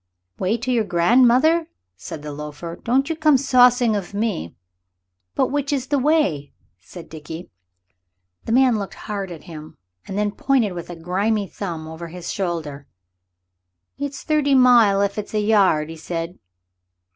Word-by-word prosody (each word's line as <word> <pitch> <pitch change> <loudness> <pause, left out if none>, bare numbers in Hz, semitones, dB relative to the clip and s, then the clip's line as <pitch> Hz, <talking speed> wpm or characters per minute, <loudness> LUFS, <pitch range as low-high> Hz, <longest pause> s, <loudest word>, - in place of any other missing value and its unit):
"Way 195 +5 0
to 250 +3 -3
your 235 -3 +2
grandmother," 250 - +3 0.3
said 95 - -8
the 150 - -6
loafer; 150 +3 -7
"don't 260 +7 0
you 325 - -2
come 305 -3 +4
saucing 245 -3 +4
of 200 -1 -5
me." 205 - -2 0.8
"But - - +1
which 285 0 -1
is 270 -3 -1
the 285 -1 +2
way?" 255 - +1 0.3
said 175 -2 -12
Dickie. 160 +2 -9 0.9
The - - -3
man 250 -2 +4
looked 200 - -6
hard 200 -2 -5
at 165 - -9
him 155 -2 -11 0.3
and 195 - -5
then 210 0 0
pointed 240 -3 +1
with 175 -1 -7
a 175 - -6
grimy 200 +6 -1
thumb 170 -5 -6
over 160 +1 -8
his 175 +1 -7
shoulder. 160 -7 -4 1.1
"It's 285 -1 -5
thirty 295 -3 +2
mile 235 -6 +5
if 200 +1 -1
it's 210 +1 -6
a - - +2
yard," 195 -8 +3
he 165 - -9
said. 165 +2 -5
205 Hz, 155 wpm, -21 LUFS, 170-250 Hz, 1.1 s, mile